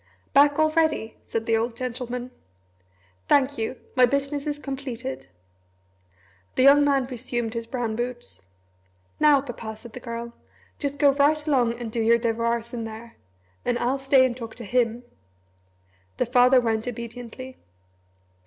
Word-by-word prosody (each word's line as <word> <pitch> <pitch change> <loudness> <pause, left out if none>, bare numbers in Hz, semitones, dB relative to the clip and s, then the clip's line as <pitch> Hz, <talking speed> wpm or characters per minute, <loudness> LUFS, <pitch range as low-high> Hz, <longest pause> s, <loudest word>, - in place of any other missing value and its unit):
"Back 285 +1 +5
already?" 310 -7 +1
said 225 0 -2
the 225 - +2
old 230 +1 -1
gentleman. 250 0 -4 1.0
"Thank 280 -2 +3
you 225 +3 -2 0.2
my 250 -1 +6
business 280 +2 -1
is 295 -1 -1
completed." 265 - -6 1.3
The 255 - +3
young 285 +2 +7
man 275 -2 +2
resumed 240 -2 -3
his 230 -1 -4
brown 235 -3 -2
boots. 240 - -5 0.8
"Now, 295 -2 +5
Papa," 230 -4 -7
said 220 +1 -13
the 250 - -7
Girl, 235 -1 -6 0.5
"just 285 -1 -3
go 285 0 +5
right 295 +2 +2
along 245 -5 +2
and 235 -2 -5
do 230 - -3
your 230 +1 +5
devoirs 235 0 -1
in 235 -2 -3
there 225 +1 -9 0.5
and 245 - 0
I'll 255 +3 0
stay 270 -1 +5
and 250 -2 -1
talk 230 -3 -8
to 240 - -8
him 240 +1 0 0.5
" 95 0 -38
The - - +1
father 250 +1 +5
went 225 -1 -1
obediently. 245 +2 -7
245 Hz, 150 wpm, -25 LUFS, 230-270 Hz, 1.3 s, young